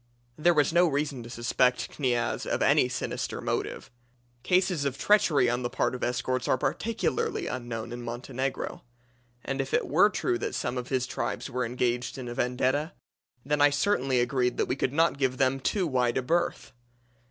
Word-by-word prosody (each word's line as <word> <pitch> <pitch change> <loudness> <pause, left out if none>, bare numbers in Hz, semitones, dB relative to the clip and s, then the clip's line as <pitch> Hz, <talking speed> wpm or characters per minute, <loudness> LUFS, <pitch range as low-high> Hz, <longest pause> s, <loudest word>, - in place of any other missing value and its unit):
There 170 +2 +3
was 150 +1 +3
no 175 +1 +5
reason 145 -3 -1
to 115 - -10
suspect 120 0 +1
Kniaz 120 -4 -1
of - - 0
any - - +4
sinister - - -3
motive - - -3 0.5
cases 180 -2 +2
of 140 -2 -2
treachery 170 -11 +4
on 120 +1 0
the 120 - -2
part - - 0
of 125 - -5
escorts 125 +1 -1
are - - +3
practically 395 - -1
unknown 120 -2 -5
in 120 0 -6
Montenegro 130 +7 -4 0.6
and 135 0 -1
if 135 - -2
it - - +1
were 185 +8 +5
true 120 - -1
that - - -3
some 125 +1 -2
of 125 - -7
the 130 -2 +1
tribes 130 +1 -3
were 125 0 -1
engaged 125 +1 -1
in 130 -2 -6
a 120 - -4
vendetta, 130 +5 0 0.5
then 150 +1 +1
I 145 - +7
certainly 145 -4 +1
agreed 125 0 +1
that - - +2
we 125 - -1
could 130 - -1
not 160 -1 +2
give 130 -2 +1
them 135 0 +2
too 185 +7 0
wide 125 -5 +1
a 130 - 0
berth. 170 +6 -1
130 Hz, 185 wpm, -28 LUFS, 125-150 Hz, 0.6 s, I